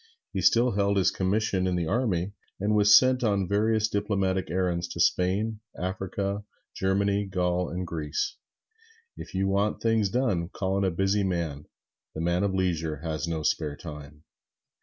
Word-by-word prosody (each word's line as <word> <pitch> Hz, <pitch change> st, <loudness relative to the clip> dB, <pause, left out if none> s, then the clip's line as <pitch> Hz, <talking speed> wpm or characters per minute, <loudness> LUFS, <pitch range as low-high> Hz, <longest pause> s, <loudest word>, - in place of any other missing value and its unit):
He -, -, -1 dB
still 120 Hz, +2 st, +4 dB
held 100 Hz, -1 st, +1 dB
his 95 Hz, -, +3 dB
commission 95 Hz, -1 st, 0 dB
in 90 Hz, -, 0 dB
the 85 Hz, -1 st, 0 dB
army, 100 Hz, -3 st, 0 dB, 0.3 s
and 105 Hz, +2 st, +1 dB
was 105 Hz, -1 st, +7 dB
sent 130 Hz, -1 st, +3 dB
on 100 Hz, -4 st, +1 dB
various 110 Hz, +2 st, +2 dB
diplomatic 100 Hz, -3 st, -1 dB
errands 90 Hz, -2 st, 0 dB
to -, -, -7 dB
Spain, 105 Hz, +4 st, +1 dB, 0.2 s
Africa, 95 Hz, +2 st, -3 dB, 0.3 s
Germany, 100 Hz, +1 st, +1 dB
Gaul 90 Hz, -1 st, 0 dB
and 90 Hz, +1 st, -4 dB
Greece. 80 Hz, -3 st, -3 dB, 0.8 s
If -, -, -9 dB
you 95 Hz, +1 st, +1 dB
want 100 Hz, +2 st, +1 dB
things 115 Hz, -3 st, +2 dB
done, 100 Hz, -8 st, 0 dB
call 95 Hz, 0 st, -2 dB
on 100 Hz, -, +1 dB
a 95 Hz, -, +2 dB
busy 95 Hz, +3 st, +1 dB
man: 85 Hz, -6 st, -2 dB, 0.5 s
the 80 Hz, -, -3 dB
man 85 Hz, +2 st, +1 dB
of 100 Hz, -, +1 dB
leisure 80 Hz, -5 st, -1 dB
has 80 Hz, 0 st, -2 dB
no 80 Hz, -2 st, -2 dB
spare 75 Hz, -1 st, -1 dB
time. 75 Hz, -1 st, -10 dB
95 Hz, 160 wpm, -27 LUFS, 85-100 Hz, 0.8 s, was